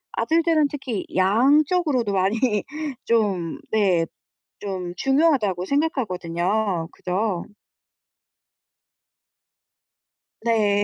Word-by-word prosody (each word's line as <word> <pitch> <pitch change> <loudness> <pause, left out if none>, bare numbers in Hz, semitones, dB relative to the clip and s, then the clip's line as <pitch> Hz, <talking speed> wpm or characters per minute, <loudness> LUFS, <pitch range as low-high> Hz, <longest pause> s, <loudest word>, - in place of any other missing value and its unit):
아들들은 325 -2 +2
특히 265 -8 -4
양적으로도 260 - +3
많이 210 +3 +1 0.4
좀 200 -8 0
네 190 -6 +2 0.6
좀 185 -3 -5
중요하다고 270 - +2
생각하거든요. 190 - -1
그죠? 185 0 -2 3.0
네. 215 -3 +2
215 Hz, 165 characters per minute, -23 LUFS, 185-270 Hz, 3.0 s, 양적으로도